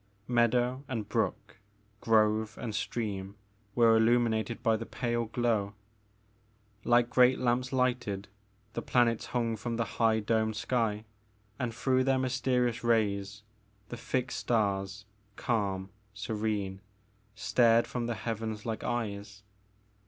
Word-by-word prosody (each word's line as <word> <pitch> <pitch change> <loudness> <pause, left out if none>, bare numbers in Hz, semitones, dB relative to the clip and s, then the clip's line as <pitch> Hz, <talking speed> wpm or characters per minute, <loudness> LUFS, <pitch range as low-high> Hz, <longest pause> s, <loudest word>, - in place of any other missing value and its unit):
Meadow 125 +2 +2
and 115 -5 -3
brook, - - -2 0.4
grove 110 -1 +2
and 115 -3 -4
stream, 100 -3 -3 0.4
were 115 -2 +5
illuminated 115 0 +2
by 115 - +3
the 115 +1 -5
pale 120 -1 -1
glow. 110 -3 0 1.1
Like 120 0 +4
great 125 +1 +5
lamps 125 +1 0
lighted 125 -6 0 0.5
the - - -3
planets 120 -2 +2
hung 115 -2 -1
from 115 +2 -4
the 115 0 0 0.2
high 110 -1 +4
domed 110 0 0
sky 110 -2 -1 0.5
and 125 -2 -1
through 130 +2 +1
their 135 0 +2
mysterious 125 -2 0
rays 100 -3 0 0.5
the 120 - -6
fixed 125 +2 -2
stars, 100 -2 -1 0.3
calm, 100 -5 -1 0.2
serene, 105 -2 -2 0.5
stared 115 +1 +4
from 120 -1 -3
the 120 - -2
heavens 110 -1 -4
like 110 -1 -3
eyes. 105 -4 -4
115 Hz, 120 wpm, -30 LUFS, 105-120 Hz, 1.1 s, were